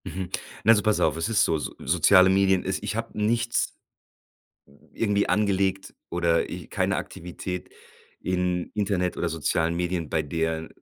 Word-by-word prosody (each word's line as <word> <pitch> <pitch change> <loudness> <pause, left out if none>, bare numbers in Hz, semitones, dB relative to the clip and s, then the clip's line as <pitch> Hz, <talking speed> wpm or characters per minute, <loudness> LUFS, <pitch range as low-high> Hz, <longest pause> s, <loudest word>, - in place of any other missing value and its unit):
Mhm. 95 -1 -5 0.3
Na, 110 - +6
also 105 -2 +5
pass 110 -1 +2
auf, - - +2
es 85 +6 -1
ist 115 - +3
so, 80 - +1
so 75 - -5
soziale 95 +2 +5
Medien 95 -1 +3
ist 95 0 -2
ich - - -3
hab 115 0 -4
nichts 115 +2 0 0.9
n 70 - -24
irgendwie 105 -2 +1
angelegt 95 -2 0 0.2
oder 85 -1 +1
e - - -7
keine - - 0
Aktivität 90 +1 -6 0.5
in 90 -1 -1
Internet 95 -4 0
oder 85 - -1
sozialen 80 +1 0
Medien, 85 -2 -2
bei 80 - +1
der 80 +1 -2
90 Hz, 160 wpm, -25 LUFS, 85-100 Hz, 0.9 s, Na